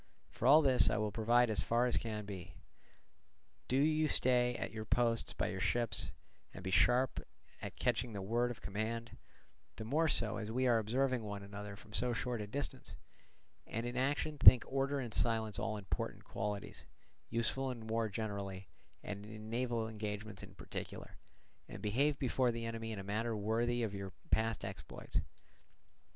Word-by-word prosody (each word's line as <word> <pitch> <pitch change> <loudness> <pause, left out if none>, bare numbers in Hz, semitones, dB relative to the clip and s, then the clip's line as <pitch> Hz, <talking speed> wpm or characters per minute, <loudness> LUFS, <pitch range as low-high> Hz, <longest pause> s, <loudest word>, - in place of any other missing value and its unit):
For 125 0 -1
all 150 +4 +8
this 130 -3 +6
I - - +1
will 105 -1 0
provide 115 +2 +3
as 105 - +1
far 120 +1 +2
as 125 - +2
can 105 -2 -2
be. 95 -3 -8 1.1
Do 130 - +2
you 155 +2 +3
stay 125 -3 +3
at - - -4
your 110 0 -5
posts 115 +1 +1
by - - -1
your 95 - -4
ships, 110 -4 +1 0.4
and - - -8
be 95 - -3
sharp 125 +6 +4 0.4
at - - -6
catching 120 -1 0
the 100 -2 -5
word 120 +4 +1
of 120 - -7
command, 115 +3 -3 0.6
the 110 - -6
more 155 +8 +2
so 115 -7 +1
as 105 -1 -4
we 130 +3 +1
are 120 -2 +4
observing 125 +3 +1
one 100 -2 -5
another 100 0 -7
from 105 0 -15
so 125 +1 +1
short 120 -1 -2
a 105 - -5
distance; 140 +7 -4 0.7
and 115 +2 -3
in 120 +1 -4
action 145 +3 0
think 125 - +10
order 135 +1 0
and 120 -5 -5
silence 110 -2 +1
all 110 -1 -2
important—qualities 100 0 -4 0.5
useful 130 +3 0
in 120 -3 -6
war 110 0 0
generally, 100 -3 -4 0.3
and 100 0 -5
in 110 0 -9
naval 120 -2 0
engagements 105 -2 -5
in 100 -1 -11
particular; - - -7 0.5
and - - -7
behave 140 +8 +1
before 130 -1 +1
the 115 -1 -3
enemy 115 0 -4
in 110 - -4
a 95 - -5
manner 110 +3 -1
worthy 115 +3 0
of 105 -3 -2
your 100 -2 -6 0.2
past 115 0 +1
exploits. - - -4
115 Hz, 170 wpm, -35 LUFS, 105-125 Hz, 1.1 s, think